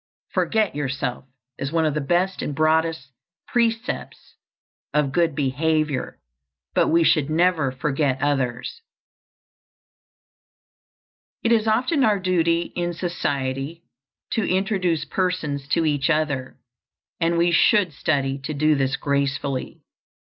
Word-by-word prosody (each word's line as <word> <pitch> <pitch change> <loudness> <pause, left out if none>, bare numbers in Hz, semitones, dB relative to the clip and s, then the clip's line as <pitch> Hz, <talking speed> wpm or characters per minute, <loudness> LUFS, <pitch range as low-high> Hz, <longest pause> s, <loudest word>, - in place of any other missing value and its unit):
"Forget 220 -3 +1
yourself" 135 -3 -3 0.3
is 135 - -3
one 165 -1 +2
of 155 - +1
the 150 - -1
best 175 +6 0
and 145 - -3
broadest 160 -2 +1 0.4
precepts 235 +2 -2 0.6
of 150 -2 +2
good 165 0 +1
behavior; 150 0 0 0.5
but - - +3
we 165 +1 +4
should 155 -2 +3
never 160 -4 +2
forget 135 0 -1
others. 135 - -1 2.6
It 230 - +2
is 225 -1 +3
often 255 +7 +2
our 210 -3 +4
duty 170 -2 +1
in 175 0 -1
society 145 -2 -3 0.5
to 225 - 0
introduce 185 -4 0
persons 155 -7 -2
to 165 +3 +1
each 145 -1 +1
other, 150 -5 -1 0.6
and 170 0 +1
we 170 +1 +3
should 185 0 +4
study 140 -2 -1
to 140 +3 -5
do 155 +2 +3
this 135 -1 +1
gracefully. 140 -1 -2
155 Hz, 120 wpm, -23 LUFS, 140-175 Hz, 2.6 s, we